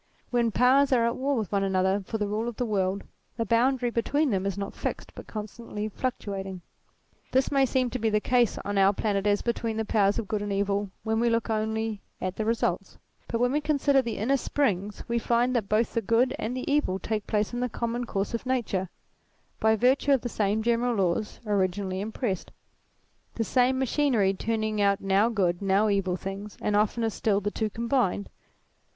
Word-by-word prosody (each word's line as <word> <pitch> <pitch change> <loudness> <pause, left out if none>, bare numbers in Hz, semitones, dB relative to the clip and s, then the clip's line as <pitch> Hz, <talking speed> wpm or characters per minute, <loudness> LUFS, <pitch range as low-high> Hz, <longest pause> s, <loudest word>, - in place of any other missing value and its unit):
When 240 -2 +2
powers 260 +5 +4
are 240 -3 +4
at 235 - 0
war 275 +1 0
with 215 -4 -3
one 200 -1 +1
another 190 +1 +1
for 220 - -3
the 210 -1 -1
rule 215 +3 -2
of 240 - -4
the 245 - -1
world, 195 -2 0 0.3
the 230 - 0
boundary 245 +2 +2
between 280 +5 +1
them 195 -1 0
is 195 - -3
not 200 0 -4
fixed - - -5
but - - -10
constantly 215 0 -5
fluctuating. 195 -6 -4 0.7
This 260 +1 +2
may 275 -1 +3
seem 255 -1 0
to 255 - -3
be 225 0 +1
the 210 0 +2
case 245 0 +2
on 205 0 0
our 195 +1 +5
planet 205 -1 0
as 205 0 +2
between 230 -2 -1
the 220 - -1
powers 205 -2 +2
of 215 - -3
good 210 -1 -1
and 205 0 -3
evil 200 0 0
when 220 0 0
we 235 0 +3
look 230 0 0
only 220 -1 -1 0.2
at 185 0 -3
the 220 - -2
results; 230 +1 -1 0.3
but 230 - -2
when 245 +1 +2
we 295 +2 +1
consider 285 -2 +3
the 230 -4 -4
inner 265 +7 +2
springs, 210 -7 -1
we 235 0 0
find 240 +2 +1
that 220 -5 0
both 220 +2 +1
the 230 - +1
good 230 +5 +2
and 245 +4 -3
the 255 - -4
evil 285 -10 +1
take 215 +1 -3
place 210 +1 0
in 240 - -2
the 250 0 -1
common 235 +2 -2
course 195 -2 -2
of 230 - -2
nature, 210 -8 -1 0.7
by 220 0 +4
virtue 260 +5 +3
of 265 - +2
the 245 - -3
same 215 0 0
general 235 +1 +1
laws 195 +1 -1
originally 190 -2 0
impressed 210 -2 -3 0.8
the 230 - 0
same 255 +3 +2
machinery 260 -7 +2
turning 215 +1 -1
out 200 -1 +3
now 195 +3 +3
good, 185 -6 0
now 200 +2 +3
evil 195 -3 +1
things, 195 +2 -7
and 210 - 0
oftener 220 +2 +1
still, 205 -1 +1
the 205 +1 -2
two 220 0 -1
combined. 230 -3 0
220 Hz, 205 wpm, -27 LUFS, 200-240 Hz, 0.8 s, our